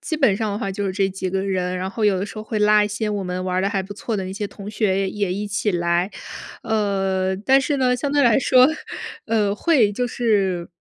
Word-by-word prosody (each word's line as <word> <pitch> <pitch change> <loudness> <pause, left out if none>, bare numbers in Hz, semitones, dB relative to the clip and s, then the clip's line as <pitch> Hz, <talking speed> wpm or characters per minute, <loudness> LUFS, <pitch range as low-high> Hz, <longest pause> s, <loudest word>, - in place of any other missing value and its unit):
基 315 - -3
本 250 -10 +3
上 215 -2 -2
的 205 - -3
话 195 -5 -3
就 200 +1 -3
是 190 - -2
这 195 0 +1
几 190 0 -4
个 190 +1 -1
人， 185 -2 -1
然 185 +1 -3
后 220 +1 -2
有 200 -2 +3
的 190 - -2
时 210 - -10
候 215 - -6
会 215 0 -4
拉 210 0 +5
一 - - -2
些 210 +1 -2
我 200 -2 -2
们 180 0 -3
玩 185 0 -2
儿 - - +2
的 195 - +1
还 200 -2 -1
不 195 +2 -8
错 215 +1 -4
的 190 - -3
那 185 - -5
些 205 +1 -3
同 200 +1 -9
学 205 -3 0
也 195 -1 -1
也 200 -3 -1
一 205 +1 -3
起 205 0 -1
来。 175 +1 +1 0.5
呃， 195 -4 0
但 265 +7 +3
是 285 +2 -1
呢， 250 -1 +2
相 280 +2 -2
对 290 -1 +3
来 235 -1 +5
说 255 0 +5 0.6
呃， 215 -3 +1
会， 230 -4 +3
就 245 +4 -1
是 195 -8 0
205 Hz, 285 characters per minute, -22 LUFS, 190-220 Hz, 0.6 s, 拉